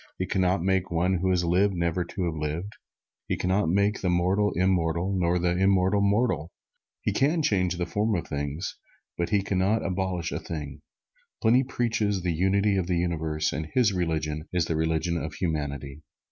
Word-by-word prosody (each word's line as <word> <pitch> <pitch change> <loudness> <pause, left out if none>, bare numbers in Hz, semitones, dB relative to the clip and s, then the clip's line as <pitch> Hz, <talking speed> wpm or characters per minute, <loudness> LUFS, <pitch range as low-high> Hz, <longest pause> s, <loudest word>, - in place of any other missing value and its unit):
He 95 - -1
can 95 - 0
not 90 -1 +2
make 95 -1 +1
one 90 +2 +1
who 95 +2 0
has 90 -1 +2
lived 95 +3 +2
never 85 +1 0
to 90 +2 -5
have 85 - -1
lived. 80 +6 -4 0.5
He - - -1
can 90 - -2
not 95 -2 +2
make 100 +3 +1
the 90 - 0
mortal, 95 +4 +2
immortal; 90 0 +1
nor 90 -1 +2
the 90 0 +1
immortal, 95 +1 +3
mortal. 100 - +1 0.5
He - - 0
can 155 +4 +2
change 90 - +1
the 90 - -1
form 105 +5 0
of 85 - -2
things, 70 +4 -4 0.4
but 85 - -2
He 100 -2 +2
can 95 -1 -1
not 105 +4 +1
abolish 90 -2 -2
a - - -2
thing. 75 -3 -6 0.6
Pliny 120 +4 +4
preaches 115 -7 -1
the 90 -2 0
Unity 100 +4 +2
of 90 -3 -1
the 90 -1 +1
Universe 80 -3 -1
and 80 0 -3
his 110 +2 +2
religion 80 -3 -2
is 90 -2 +1
the 80 - -1
religion 80 +2 0
of 75 -1 -5
Humanity. 75 -4 -3
90 Hz, 190 wpm, -26 LUFS, 80-100 Hz, 0.6 s, Pliny